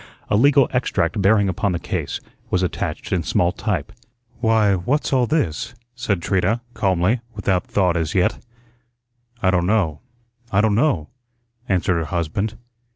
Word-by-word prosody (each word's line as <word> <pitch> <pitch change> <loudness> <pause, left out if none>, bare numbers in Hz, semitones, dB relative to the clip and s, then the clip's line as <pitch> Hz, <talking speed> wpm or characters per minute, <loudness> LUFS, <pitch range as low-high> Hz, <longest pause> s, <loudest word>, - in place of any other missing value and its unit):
A - - +4
legal 140 +3 +5
extract 100 -7 0
bearing 100 +1 +4
upon 100 0 0
the - - 0
case - - -3 0.3
was 90 0 +1
attached 90 - -3
in - - +2
small 90 0 +1
type. 100 -4 -2 0.5
"Why, 110 -3 +3
what's 125 +12 0
all 125 -2 +3
this?" 140 - -1 0.2
said 105 -8 -2
Trina, 105 +5 +1
calmly, 95 +4 +1 0.2
without 95 -2 0
thought 90 -3 +2
as 80 -2 -1
yet. 90 -1 +1 1.0
"I 95 - +4
don' 90 -1 +1
know, 90 -8 +1 0.5
I 100 - +3
don' 105 0 +3
know," 105 - +1 0.6
answered 90 -2 +2
her 80 - -2
husband. 85 +7 -2
100 Hz, 150 wpm, -21 LUFS, 90-110 Hz, 1.0 s, legal